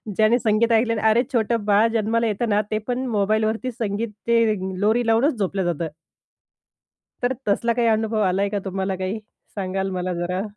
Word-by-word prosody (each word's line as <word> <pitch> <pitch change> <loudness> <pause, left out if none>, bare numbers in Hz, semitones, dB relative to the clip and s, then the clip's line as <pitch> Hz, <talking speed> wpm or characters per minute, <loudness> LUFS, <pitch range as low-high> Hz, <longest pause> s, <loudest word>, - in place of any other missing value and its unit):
ज्याने 220 +4 +4
संगीत 225 +1 +2
ऐकलं 230 +1 +3
आणि 215 - -2
अरे 235 +3 +4
छोटं 230 -1 0
बाळ 210 +2 +4
जन्माला 230 +1 +1
येतं 220 +2 -1
ना, 205 +1 +3
ते 215 - +1
पण 250 +1 -1
मोबाईलवरती 220 +3 0
संगीत 225 -1 -3 0.2
ते 235 0 +4 0.4
लोरी 225 +3 +2
लावूनच 235 +7 +3
झोपलं 195 -1 -1
जातं. 170 -2 -1 1.4
तर 250 +2 +2
तसला 230 +3 +1
काही 235 0 +1
अनुभव 220 0 +1
आलाय 195 +2 +1
का 205 -1 -2
तुम्हाला 190 0 -2
काही 190 +4 -3 0.4
सांगाल 195 0 -2
मला 185 0 -2
जरा? 175 +2 -2
215 Hz, 170 wpm, -22 LUFS, 195-230 Hz, 1.4 s, ज्याने